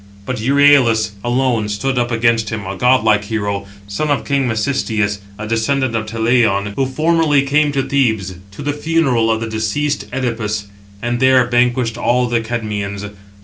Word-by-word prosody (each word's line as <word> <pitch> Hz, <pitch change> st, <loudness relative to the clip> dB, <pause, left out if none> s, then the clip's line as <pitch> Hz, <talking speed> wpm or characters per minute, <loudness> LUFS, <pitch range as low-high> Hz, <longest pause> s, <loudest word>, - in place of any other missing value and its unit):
But 130 Hz, +2 st, -3 dB
Euryalus 130 Hz, -4 st, +4 dB
alone 120 Hz, -3 st, 0 dB
stood 125 Hz, +5 st, -1 dB
up 120 Hz, 0 st, 0 dB
against 115 Hz, -2 st, +1 dB
him, 110 Hz, -3 st, -5 dB
a 95 Hz, +1 st, -5 dB
godlike 110 Hz, -3 st, +3 dB
hero, 100 Hz, -2 st, -3 dB, 0.2 s
son 100 Hz, +10 st, -2 dB
of 145 Hz, -, 0 dB
king 140 Hz, -2 st, 0 dB
Mecisteus, 110 Hz, -3 st, -1 dB, 0.2 s
a 110 Hz, -, -6 dB
descendant 115 Hz, +3 st, 0 dB
of 110 Hz, -1 st, -2 dB
Talaïon, 110 Hz, -3 st, +1 dB
who 135 Hz, -, 0 dB
formerly 155 Hz, 0 st, +2 dB
came 145 Hz, +2 st, +2 dB
to 140 Hz, -1 st, 0 dB
Thebes 110 Hz, -10 st, 0 dB, 0.2 s
to 100 Hz, +9 st, -9 dB
the 145 Hz, 0 st, -1 dB
funeral 145 Hz, -7 st, +1 dB
of 110 Hz, 0 st, 0 dB
the 115 Hz, -, -3 dB
deceased 110 Hz, +7 st, -2 dB
Œdipus, 115 Hz, -5 st, -2 dB, 0.4 s
and 120 Hz, 0 st, -1 dB
there 130 Hz, -1 st, +4 dB
vanquished 120 Hz, -1 st, +1 dB
all 125 Hz, +1 st, +2 dB
the 120 Hz, -1 st, 0 dB
Cadmeans. 105 Hz, -3 st, -4 dB
120 Hz, 160 wpm, -17 LUFS, 110-135 Hz, 0.4 s, Euryalus